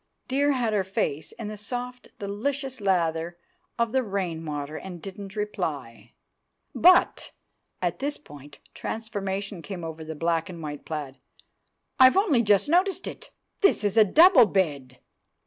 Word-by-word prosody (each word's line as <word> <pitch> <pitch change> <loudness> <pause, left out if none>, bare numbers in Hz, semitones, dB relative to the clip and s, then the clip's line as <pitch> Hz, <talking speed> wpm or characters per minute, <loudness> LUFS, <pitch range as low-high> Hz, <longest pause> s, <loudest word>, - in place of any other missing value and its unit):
Dear 285 +2 +2
had 240 -4 0
her 200 -2 +2
face 160 -5 -2
in 225 - -7
the 215 0 -6
soft 245 +4 -6
delicious 260 +5 -3
lather 170 -3 0 0.4
of 235 -1 0
the 265 - +2
rainwater, 165 - -4
and 180 +1 -7
didn't 195 +2 -9
reply. 145 - -4 0.6
"But"—at 360 0 +1
this 285 +2 -2
point 145 0 -14 0.2
transformation 200 -4 -4
came 180 -1 -7
over 160 0 -6
the 160 0 -7
black 165 +3 -1
and 170 -3 -8
white 145 -1 -6
plaid—"I've 155 - -1
only 345 - +3
just 205 0 +3
noticed 370 +4 +2
it! - - -8 0.3
This 395 - +4
is 205 -1 0
a 220 - +8
double 300 - +7
bed! 145 -10 -1
200 Hz, 135 wpm, -26 LUFS, 160-245 Hz, 0.6 s, a